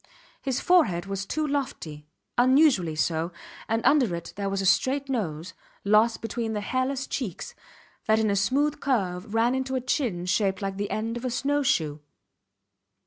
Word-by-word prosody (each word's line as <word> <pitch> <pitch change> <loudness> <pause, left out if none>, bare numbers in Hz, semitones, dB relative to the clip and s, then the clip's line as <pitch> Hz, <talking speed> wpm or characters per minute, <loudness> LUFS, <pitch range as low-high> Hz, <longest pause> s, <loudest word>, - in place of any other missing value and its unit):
His 265 -2 -1
forehead 295 - +3
was 195 0 -4
too 310 0 -1
lofty 200 - -4 0.3
unusually 250 - +4
so 160 +2 0 0.4
and 225 +1 0
under 255 - +4
it 170 - -8
there 200 -1 -2
was 195 0 -2
a 195 - -1
straight 270 +8 +2
nose, 180 - -3 0.3
lost 215 +3 +3
between 225 0 -3
the 210 - -2
hairless 260 +4 -1
cheeks, 250 - -5 0.5
that 220 0 +4
in 220 -2 +2
a - - +1
smooth 275 +9 +1
curve 200 -6 -1
ran 230 +2 +3
into 265 0 -2
a - - +1
chin 240 - -1
shaped 190 +1 +1
like 195 -2 -4
the 205 0 -2
end 225 +2 -2
of 240 - -8
a - - 0
snow 280 +4 0
shoe. 155 - 0
225 Hz, 170 wpm, -26 LUFS, 190-265 Hz, 0.5 s, unusually